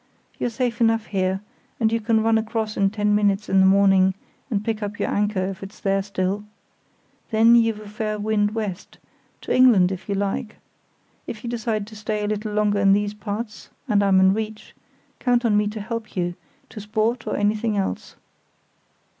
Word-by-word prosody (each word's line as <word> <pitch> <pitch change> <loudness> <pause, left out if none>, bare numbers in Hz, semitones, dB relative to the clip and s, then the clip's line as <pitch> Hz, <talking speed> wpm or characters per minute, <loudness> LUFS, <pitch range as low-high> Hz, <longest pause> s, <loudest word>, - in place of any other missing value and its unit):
"You're - - 0
safe 240 0 -2
enough 225 -1 +3
here, 190 -1 -1 0.4
and 220 -2 +2
you 230 - +1
can 220 0 +2
run 225 0 +3
across 220 -1 -3
in 195 0 +2
ten 210 0 0
minutes 205 0 +1
in 195 - +4
the 190 - +6
morning 190 -1 +4 0.3
and 210 -4 -2
pick 225 -1 -2
up 205 0 -4
your - - -1
anchor, 205 -2 0
if 190 0 -5
it's 195 +1 -10
there 195 0 +1
still. 195 0 -2 0.9
Then 225 +1 +5
you've 225 -2 +3
a 215 - -11
fair 215 0 -3
wind 210 0 0
west—to 205 -4 -6
England 225 -8 +5
if 190 +2 -7
you 200 - 0
like. 205 +3 -2 0.7
If 220 - -7
you 240 - -4
decide 225 -3 -2
to 215 +1 -13
stay 210 0 -3
a - - -1
little 215 0 -3
longer 210 -1 +1
in 195 0 +5
these 205 0 0
parts, 210 +1 -6 0.2
and 210 -4 +3
I'm 195 -2 +4
in 190 0 +5
reach, 215 0 -5 0.5
count 245 -1 +1
on 215 -3 +3
me 210 0 +2
to 215 +1 -5
help 225 +1 -6
you, 175 -1 0 0.4
to - - -9
sport 220 +3 -1
or - - -1
anything 210 +1 0
else." 195 - -3
210 Hz, 190 wpm, -23 LUFS, 200-220 Hz, 0.9 s, the